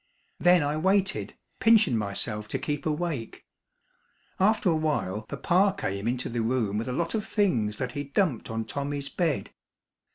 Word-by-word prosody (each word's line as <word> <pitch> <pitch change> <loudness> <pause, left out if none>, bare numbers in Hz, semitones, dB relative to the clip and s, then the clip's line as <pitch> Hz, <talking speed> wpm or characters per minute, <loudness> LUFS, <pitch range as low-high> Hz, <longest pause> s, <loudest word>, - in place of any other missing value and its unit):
Then 175 -2 +5
I 145 +1 0
waited, 190 +4 +1 0.2
pinchin' 220 - +5
myself 105 0 -2
to - - -2
keep 145 +1 -3
awake. 150 -6 -3 0.9
After 205 -1 +3
a - - +2
while 125 -10 -1
papa 190 +3 +2
came 100 - -3
into 125 +1 -1
the 120 0 -2
room 110 -3 0
with 115 - -4
a - - -2
lot 165 +6 -1
of 215 -2 -2
things 120 - +1
that 125 -1 -3
he 145 +3 -4
dumped 145 - 0
on 115 0 -3
Tommy's 140 +1 -3
bed. 165 -4 -1
145 Hz, 160 wpm, -27 LUFS, 115-180 Hz, 0.9 s, Then